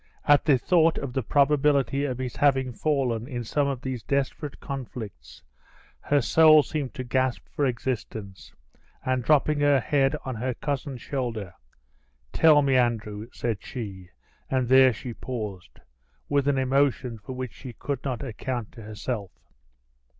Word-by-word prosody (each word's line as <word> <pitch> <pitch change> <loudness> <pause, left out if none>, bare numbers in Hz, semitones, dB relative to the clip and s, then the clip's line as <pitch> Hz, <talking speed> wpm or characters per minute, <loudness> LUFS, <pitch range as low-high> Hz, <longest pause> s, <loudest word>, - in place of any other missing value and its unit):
At 145 -1 +5
the 145 -4 +5
thought 165 +4 +3
of 135 -3 -4
the 130 - 0
probability 140 +2 +2
of 130 -3 -3
his 130 -2 -5
having 135 -3 +2
fallen 125 -5 0
in 120 -4 -4
some 140 +5 0
of 135 -3 -3
these 130 -3 -3
desperate 140 +2 -2
conflicts, 110 - -8 0.6
her 145 -1 +1
soul 155 +3 +6
seemed 145 -3 -4
to 130 - -4
gasp 130 0 0
for 145 -3 +2
existence; 115 -5 -5 0.5
and 130 -1 0
dropping 150 +1 +3
her 145 -1 +4
head 135 +3 +1
on 130 - -3
her 125 +2 -3
cousin's 135 -3 -4
shoulder, 115 -9 -3 0.8
"Tell 155 -3 +6
me, 135 -2 +3
Andrew," 110 -3 -1
said 115 -4 -3
she, 95 -7 -7 0.4
and 130 -2 +1
there 130 +1 +7
she 120 +1 -7
paused, 105 -8 -6 0.5
with 140 -1 +1
an 140 -1 +2
emotion 130 -3 +1
for 105 +6 -8
which 130 -2 -5
she 130 -3 -9
could 140 +2 -4
not 130 -1 -3
account 120 -2 -4
to 115 - -12
herself. 105 -1 -5
130 Hz, 150 wpm, -26 LUFS, 120-140 Hz, 0.8 s, there